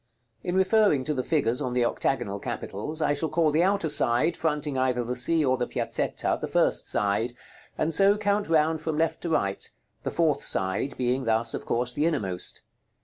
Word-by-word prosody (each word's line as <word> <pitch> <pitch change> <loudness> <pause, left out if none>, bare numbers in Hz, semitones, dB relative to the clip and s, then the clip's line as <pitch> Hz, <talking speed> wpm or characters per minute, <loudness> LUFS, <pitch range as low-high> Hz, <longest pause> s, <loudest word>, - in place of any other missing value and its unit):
In 175 - -2
referring 190 -6 +3
to 150 - -1
the 130 - -1
figures 135 -5 0
on 125 -3 -2
the 125 -1 +2
octagonal 100 -5 -1
capitals, 150 +12 -4
I 145 - +2
shall 155 +2 -1
call 160 -1 +2
the 155 +3 +2
outer 195 -2 +1
side, 145 +2 +2
fronting 150 -3 -1
either 130 -1 +1
the 125 +1 -3
Sea 155 +5 +2
or 130 0 +2
the 125 - -1
Piazzetta, - - -1
the - - -2
first - - +1
side; 105 +4 0 0.4
and 160 +1 0
so 200 +5 +5
count 205 -2 0
round 160 0 +2
from 160 -1 -2
left 165 0 0
to 170 - -3
right; 100 -11 0 0.3
the - - -3
fourth 160 -4 +1
side 95 +8 -1
being 130 +1 0
thus, 115 0 +2
of - - -6
course, 120 +1 0
the 150 +5 +1
innermost. 95 - -3
145 Hz, 195 wpm, -26 LUFS, 120-165 Hz, 0.4 s, so